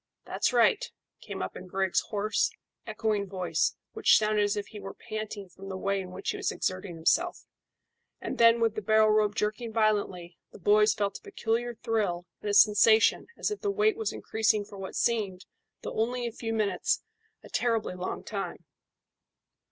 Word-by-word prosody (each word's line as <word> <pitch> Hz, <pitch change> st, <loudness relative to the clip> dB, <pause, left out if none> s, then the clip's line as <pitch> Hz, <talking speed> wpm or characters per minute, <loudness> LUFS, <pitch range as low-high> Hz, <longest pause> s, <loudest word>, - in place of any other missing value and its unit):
"That's -, -, 0 dB
right," 245 Hz, -, +4 dB, 0.4 s
came -, -, -5 dB
up -, -, -5 dB
in -, -, -9 dB
Griggs' 190 Hz, 0 st, +1 dB
hoarse, 210 Hz, 0 st, +1 dB, 0.4 s
echoing 215 Hz, -2 st, -1 dB
voice, 175 Hz, -4 st, 0 dB, 0.2 s
which -, -, +5 dB
sounded 215 Hz, 0 st, +2 dB
as 205 Hz, 0 st, 0 dB
if 205 Hz, -, -2 dB
he 215 Hz, -, -9 dB
were 195 Hz, -1 st, -8 dB
panting 215 Hz, -3 st, -6 dB
from 195 Hz, +2 st, -11 dB
the 190 Hz, -, -4 dB
way 195 Hz, +1 st, -1 dB
in 185 Hz, -, -8 dB
which 180 Hz, -, -3 dB
he -, -, -5 dB
was -, -, -1 dB
exerting 185 Hz, -1 st, -3 dB
himself; 335 Hz, -, +1 dB, 0.7 s
and -, -, -5 dB
then 230 Hz, 0 st, +6 dB
with 225 Hz, -2 st, +2 dB
the 215 Hz, -, -4 dB
barrel 215 Hz, +1 st, +4 dB
rope 210 Hz, -1 st, +2 dB
jerking 220 Hz, +2 st, -2 dB
violently, 205 Hz, -6 st, 0 dB
the -, -, -12 dB
boys 210 Hz, +3 st, +4 dB
felt 200 Hz, -1 st, -2 dB
a -, -, -39 dB
peculiar 240 Hz, -, -2 dB
thrill 210 Hz, -7 st, -1 dB, 0.2 s
and 210 Hz, -, -3 dB
a 205 Hz, -, +1 dB
sensation 215 Hz, +2 st, +5 dB
as -, -, -1 dB
if 420 Hz, -, -4 dB
the 410 Hz, -, 0 dB
weight 420 Hz, +1 st, +2 dB
was 445 Hz, 0 st, -2 dB
increasing 220 Hz, -1 st, 0 dB
for 200 Hz, -1 st, -11 dB
what 190 Hz, -, -7 dB
seemed, 205 Hz, -6 st, 0 dB, 0.4 s
though -, -, -5 dB
only 240 Hz, +2 st, -1 dB
a 235 Hz, -, -2 dB
few 225 Hz, 0 st, -5 dB
minutes, 215 Hz, -2 st, 0 dB, 0.4 s
a -, -, -13 dB
terribly 230 Hz, -5 st, 0 dB
long 180 Hz, 0 st, -5 dB
time. -, -, -5 dB
215 Hz, 185 wpm, -28 LUFS, 195-225 Hz, 0.7 s, then